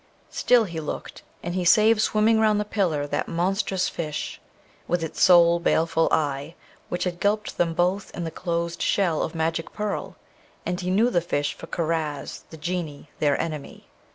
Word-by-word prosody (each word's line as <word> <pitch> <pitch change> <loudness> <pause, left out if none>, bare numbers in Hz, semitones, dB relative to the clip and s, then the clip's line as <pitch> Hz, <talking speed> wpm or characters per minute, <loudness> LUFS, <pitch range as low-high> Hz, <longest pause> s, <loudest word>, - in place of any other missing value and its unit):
Still 245 -2 +4
he 170 -6 -5
looked, 150 - -6 0.2
and 175 - -3
he 185 0 -1
save 215 +4 +5
swimming 220 +1 +3
round 215 -1 +3
the 210 - -1
pillar 175 -9 0
that 145 - -2
monstrous 185 +1 0
fish, 155 -3 -4 0.5
with 175 -1 0
its 160 -1 -5
sole 170 -1 +6
baleful 165 -1 +2
eye, 145 +1 -1 0.3
which 175 - -2
had 175 -1 -3
gulped 210 +2 -1
them 165 -1 +1
both 180 +3 +1
in 175 - -3
the 165 - -4
closed 170 -1 -3
shell 175 -6 +1
of 160 - -3
magic 165 0 -1
pearl; 210 -1 -3 0.5
and 180 +1 -2
he 180 - -2
knew 220 +6 +3
the 175 - +2
fish 145 -4 -1
for 165 - -11
Karaz, 155 -4 -3
the 160 - -10
Genie, 155 -3 -4
their 145 -2 +2
enemy. 155 -4 -5
170 Hz, 175 wpm, -25 LUFS, 160-195 Hz, 0.5 s, sole